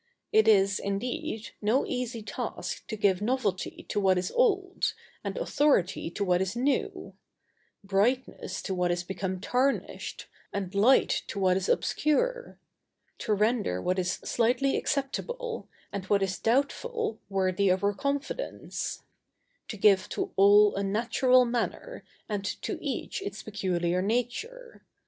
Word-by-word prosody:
It 220 0 +5
is, 200 -2 +5
indeed, 230 +5 -3
no 220 +6 +2
easy 240 -2 -3
task 210 - -5
to 220 - -4
give 200 -3 +2
novelty 215 -5 -1
to - - 0
what 190 -2 +3
is 180 0 -1
old, 390 -6 +1 0.3
and - - -4
authority 285 - +1
to 200 +4 -3
what 180 -1 +2
is 190 +3 -2
new; 265 +3 -1 0.7
brightness 205 +7 0
to 195 - -2
what 180 -1 +1
is 175 0 0
become 190 0 -3
tarnished, 255 +7 -1 0.3
and 195 -2 -4
light 220 +7 +4
to - - -6
what 185 -1 +3
is 190 0 -1
obscure; 485 +12 0 0.6
to 215 - 0
render 210 - +1
what 185 - 0
is 180 0 0
slighted 245 +4 +1
acceptable, 465 - -2 0.3
and 195 -2 -4
what 200 0 +2
is 190 -1 -2
doubtful 435 - 0
worthy 190 0 +1
of 185 +2 +2
our 205 0 +2
confidence; 280 - -3 0.6
to 215 - -6
give 195 -1 +4
to - - -3
all 205 +1 +6
a 200 - -1
natural 240 +5 +3
manner, 245 - -3 0.2
and 205 -2 -2 0.2
to - - -3
each - - -3
its 400 +1 -6
peculiar 180 -4 -1
nature. 250 - -3
215 Hz, 140 wpm, -28 LUFS, 195-270 Hz, 0.7 s, all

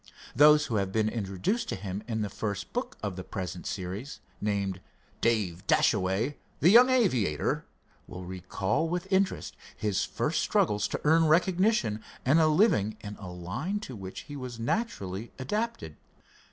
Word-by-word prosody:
Those 150 0 +7
who 110 - -1
have 100 -1 -1
been 110 +1 +1
introduced 105 - -2
to - - -1
him 95 +1 -5
in 110 -2 -1
the 105 - -3
first 105 -3 -4
book - - -3
of 100 -3 -2
the 95 - -6
present 90 -3 -5
series, 100 +8 -5 0.2
named 100 -3 -1 0.4
"Dave 100 -7 0
Dashaway, 95 +10 +2 0.2
the 175 - +6
Young 245 +4 +8
Aviator," 130 - +1 0.4
will 90 0 -8
recall 95 - -1
with 180 +2 -2
interest 190 0 +1 0.2
his 105 -3 0
first - - -1
struggles 105 0 +2
to - - -4
earn 160 +2 +5
recognition 170 - +2 0.2
and 140 +6 +5
a 160 - +5
living 150 - +3
in 105 0 -7
a 95 - -8
line 105 - -3
to 130 - -7
which 95 -2 -7
he 145 - -9
was 125 -3 -6
naturally 115 - -2
adapted. 135 - -3
110 Hz, 155 wpm, -29 LUFS, 95-155 Hz, 0.4 s, Young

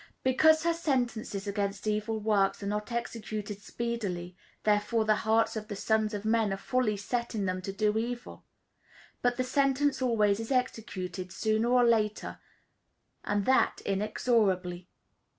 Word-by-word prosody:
Because 315 +5 +5
her 335 0 +2
sentences 245 - -1
against 200 0 -2
evil 215 +1 -1
works 205 -2 +1
are - - -4
not 210 +3 -3
executed 215 -3 -4
speedily, 200 -7 -4 0.3
therefore 210 +2 +2
the 215 -1 +3
hearts 225 0 +3
of 215 -1 -5
the 205 - -5
sons 215 +1 +1
of 205 +1 -5
men 220 -2 +2
are 195 - -1
fully 215 0 0
set 235 +4 -3
in 205 -2 -1
them 185 0 -2
to 195 - -4
do 210 +1 +1
evil. 240 +2 -4 0.8
But 245 0 +1
the 255 - +1
sentence 275 +1 +1
always 215 -5 +2
is 225 +3 -5
executed, 190 -8 -2
sooner 220 +2 0
or 250 0 +5
later, 215 -3 +1 0.8
and 205 -1 0
that 260 - +3
inexorably. 195 -3 0
215 Hz, 150 wpm, -29 LUFS, 200-235 Hz, 0.8 s, Because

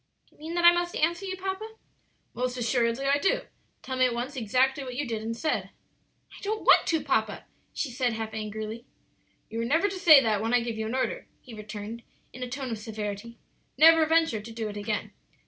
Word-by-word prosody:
"Do - - -29
you - - -28
mean 325 +2 -5
that 345 0 +2
I 345 - +11
must 350 0 -1
answer 345 +5 0
you, 375 0 -4
papa?" 385 +4 -5 0.6
"Most 250 0 -2
assuredly 235 +1 0
I 280 +1 +3
do; 390 - +1 0.4
tell 260 - -4
me 255 0 +4
at 240 - -3
once 250 +4 -4
exactly 260 +4 +1
what 255 -2 -7
you 290 +3 -2
did 225 -2 -3
and 230 +1 -4
said." 315 +5 -1 0.7
"I - - -13
don't 430 +2 -3
want - - +6
to, 320 -3 +1
papa," 220 -7 -1 0.3
she 275 - -3
said, 245 -1 0
half 220 0 -5
angrily. 215 +1 -5 0.7
"You 225 +1 -3
are - - -1
never 325 +11 +2
to 385 - -6
say 315 -6 +9
that 220 -5 +1
when 225 +2 +1
I 245 - +4
give 230 -1 -3
you 220 - -2
an 230 - -3
order," - - -2
he 245 - -13
returned, 215 +1 -7 0.3
in 255 - -10
a 250 - -4
tone 265 0 -4
of 225 - -4
severity; 215 +1 -6 0.4
"never 320 +1 +7
venture 325 -9 +2
to 225 +2 -10
do 225 -1 -4
it 205 - -8
again. 205 0 -3
250 Hz, 220 wpm, -27 LUFS, 225-315 Hz, 0.7 s, I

